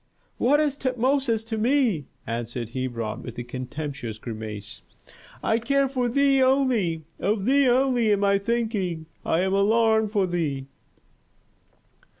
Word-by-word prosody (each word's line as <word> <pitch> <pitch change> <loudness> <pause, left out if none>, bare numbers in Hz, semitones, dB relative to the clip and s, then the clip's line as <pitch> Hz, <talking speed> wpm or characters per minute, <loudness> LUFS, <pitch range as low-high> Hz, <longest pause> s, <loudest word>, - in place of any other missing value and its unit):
"What 285 +4 +4
is 295 -2 +1
Tutmosis 255 -2 0
to 225 -1 -3
me?" 230 - +2 0.2
answered 120 0 -4
Hebron, 120 -4 -3
with 120 - -9
a 120 - -3
contemptuous 130 -1 -5
grimace. 110 -2 -7 0.6
"I 220 - +2
care 275 +3 +2
for 255 -2 -1
thee 275 +1 +3
only! 250 - +2 0.2
Of 200 0 0
thee 275 +2 +4
only 245 -3 +3
am 205 -1 +2
I 200 0 +3
thinking, 200 -7 -1 0.2
I 165 - +1
am 190 +1 0
alarmed 220 +2 +3
for 200 -3 +2
thee!" 155 -7 -2
210 Hz, 135 wpm, -25 LUFS, -, 0.6 s, What